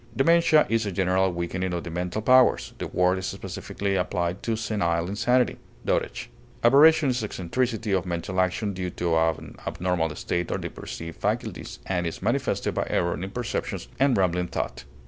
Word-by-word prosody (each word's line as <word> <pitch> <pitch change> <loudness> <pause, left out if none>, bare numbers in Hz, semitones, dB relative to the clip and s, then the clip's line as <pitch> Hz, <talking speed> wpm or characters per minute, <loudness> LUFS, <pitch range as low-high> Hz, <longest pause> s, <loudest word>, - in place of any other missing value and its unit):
Dementia 165 +2 +5
is 115 -2 +1
a - - -2
general 95 0 +2
weakening 90 +1 -2
of 85 - -3
the 85 - -6
mental 90 +5 -3
powers: 130 +1 +4
the - - -3
word 90 +1 +2
is 95 - -4
specifically 100 -1 -4
applied 90 0 -1
to 115 - -1
senile 90 -7 0
insanity, 120 +6 +2 0.3
dotage. - - -1 0.3
Aberration 145 +4 +6
is 125 -2 -1
eccentricity 110 +3 -2
of 95 -2 +1
mental 90 +2 -1
action 95 +3 -1
due 90 -1 -3
to 85 -1 -1
an 80 -1 0
abnormal 85 -3 -1
state 85 -1 -2
of - - -2
the - - -3
perceptive 80 +7 -7
faculties, - - -3
and 90 -2 -1
is 85 - -5
manifested - - 0
by - - -1
error 85 0 +1
in 95 +2 -5
perceptions 115 - -4
and 135 -2 +4
rambling 90 -1 +1
thought. - - -4
95 Hz, 170 wpm, -26 LUFS, 85-115 Hz, 0.3 s, Aberration